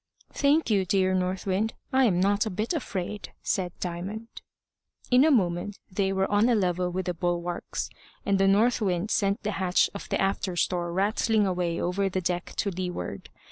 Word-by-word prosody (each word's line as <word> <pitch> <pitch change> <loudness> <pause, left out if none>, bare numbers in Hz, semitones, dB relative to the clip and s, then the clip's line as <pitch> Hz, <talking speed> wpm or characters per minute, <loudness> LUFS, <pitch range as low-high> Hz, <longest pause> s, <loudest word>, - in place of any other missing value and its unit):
"Thank 285 -1 +2
you, 200 -2 +3
dear 185 0 +2
North 185 0 -1
Wind. 200 +3 0 0.2
I 265 0 +5
am 180 -6 +2
not 200 +3 +2
a - - -1
bit 215 - -2
afraid," 210 - -4
said 185 -4 -1
Diamond. 190 +6 -5 0.7
In 250 +2 +6
a 315 - +5
moment 195 - +1
they 195 0 0
were 190 0 +1
on 210 +4 +4
a 240 - +4
level 180 -3 +1
with 185 +1 -3
the 180 - -1
bulwarks, 175 0 -2 0.4
and 200 -1 +2
North 230 +4 +3
Wind 190 +1 0
sent 200 0 +1
the 210 - -1
hatch 180 -1 +3
of 200 - -8
the - - 0
after 195 -1 0
store 175 0 0
rattling 210 +3 +2
away 180 -3 -1
over 195 +3 0
the 185 - -1
deck 175 0 -2
to 200 - -1
leeward. 180 0 -5
190 Hz, 180 wpm, -27 LUFS, 180-210 Hz, 0.7 s, In